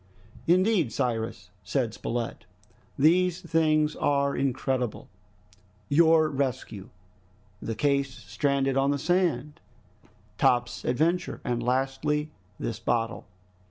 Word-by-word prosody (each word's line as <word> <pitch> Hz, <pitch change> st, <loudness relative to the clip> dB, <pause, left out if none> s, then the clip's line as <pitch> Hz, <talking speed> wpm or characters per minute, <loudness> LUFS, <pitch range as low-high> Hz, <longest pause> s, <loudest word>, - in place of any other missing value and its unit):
"Indeed, 180 Hz, -, +3 dB
Cyrus," 115 Hz, -8 st, -3 dB
said 125 Hz, -6 st, -1 dB
Spilett, 115 Hz, -3 st, -4 dB, 0.5 s
"these 175 Hz, +4 st, +3 dB
things 155 Hz, -2 st, +1 dB
are 140 Hz, -1 st, +1 dB
incredible! 130 Hz, -2 st, -2 dB, 0.8 s
Your 160 Hz, +1 st, +5 dB
rescue, 130 Hz, -7 st, -3 dB, 0.7 s
the 115 Hz, -, -4 dB
case 140 Hz, +2 st, +1 dB
stranded 135 Hz, 0 st, -1 dB
on 135 Hz, +1 st, +2 dB
the 145 Hz, -, +1 dB
sand, 155 Hz, -3 st, 0 dB, 0.8 s
Top's 120 Hz, 0 st, +2 dB
adventure, 165 Hz, +8 st, 0 dB
and 120 Hz, -1 st, -1 dB
lastly 135 Hz, +5 st, 0 dB, 0.3 s
this 115 Hz, -1 st, -4 dB
bottle... 115 Hz, -3 st, -1 dB
140 Hz, 95 wpm, -27 LUFS, 120-155 Hz, 0.8 s, Your